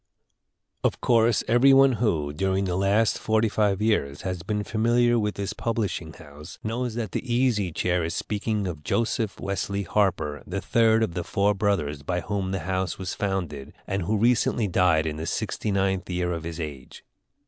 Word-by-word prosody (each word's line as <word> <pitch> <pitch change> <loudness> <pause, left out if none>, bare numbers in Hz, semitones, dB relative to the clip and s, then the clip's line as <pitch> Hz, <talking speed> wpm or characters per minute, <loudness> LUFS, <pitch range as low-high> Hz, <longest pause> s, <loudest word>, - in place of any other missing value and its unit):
Of - - +1
course 115 -2 +3
every 120 +4 +5
one 135 0 +6
who, 75 -10 0
during 95 +4 0
the 90 -2 -1
last 100 +4 +2
forty 110 +1 +2
five 105 -1 +1
years, 70 -11 0
has 90 -2 -3
been 105 +3 -2
familiar 120 +2 +2
with 105 -1 -1
this 100 0 -3
publishing 105 -9 -2
house, 75 +2 -12
knows 115 +1 -2
that 115 -5 -3
the 125 - -4
Easy 120 -7 +1
Chair 90 +2 0
is 80 - -3
speaking 105 0 -2
of 80 -5 -5
Joseph 115 - -1
Wesley 100 0 -2
Harper, 80 -6 0
the 100 +2 -3
third 110 +3 +3
of 105 - -2
the 90 0 -3
four 100 +4 +1
brothers 95 -9 -1
by 90 +5 -2
whom 100 -1 -2
the 95 -2 -2
house 95 +1 -2
was 95 -1 -4
founded, 90 -9 -3
and 95 0 -2
who 105 +5 0
recently 115 0 +2
died 90 -4 +3
in 75 -1 -3
the 80 - -4
sixty - - -2
ninth 95 -2 0
year 90 -1 -1
of 85 -1 -5
his 85 0 -6
age. 75 -5 -8
100 Hz, 180 wpm, -25 LUFS, 85-110 Hz, -, one